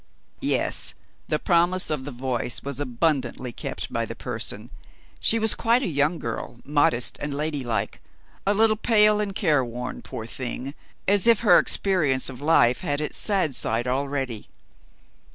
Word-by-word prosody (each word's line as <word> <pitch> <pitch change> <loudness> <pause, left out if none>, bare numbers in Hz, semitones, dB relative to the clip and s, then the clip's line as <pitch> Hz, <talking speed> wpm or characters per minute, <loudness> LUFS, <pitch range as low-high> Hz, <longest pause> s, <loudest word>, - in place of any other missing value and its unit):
Yes! - - +3 0.3
the 155 - 0
promise 175 +1 +1
of 130 -4 -3
the 145 - -6
voice 125 -1 -3
was 140 -1 -6
abundantly 130 -2 -1
kept - - -6
by - - 0
the - - -6
person. - - -4 0.5
She 225 - +3
was 220 0 +2
quite 235 +3 +1
a - - -1
young 150 +1 +1
girl, 115 -1 -6
modest 145 -4 +1
and 145 -1 -4
ladylike; 140 -8 -2 0.5
a 205 - +3
little 215 0 +3
pale 210 -2 +3
and 200 -2 -4
careworn, 130 - -1
poor 110 - -8
thing, 130 +3 -5 0.3
as 200 +2 +5
if 230 -3 +5
her 225 - +6
experience 150 -10 +1
of 125 +1 -11
life 145 -5 +3
had 145 -5 -1
its 150 - -1
sad 190 -9 +1
side 115 0 +1
already. 135 -3 -3
145 Hz, 150 wpm, -24 LUFS, 125-185 Hz, 0.5 s, her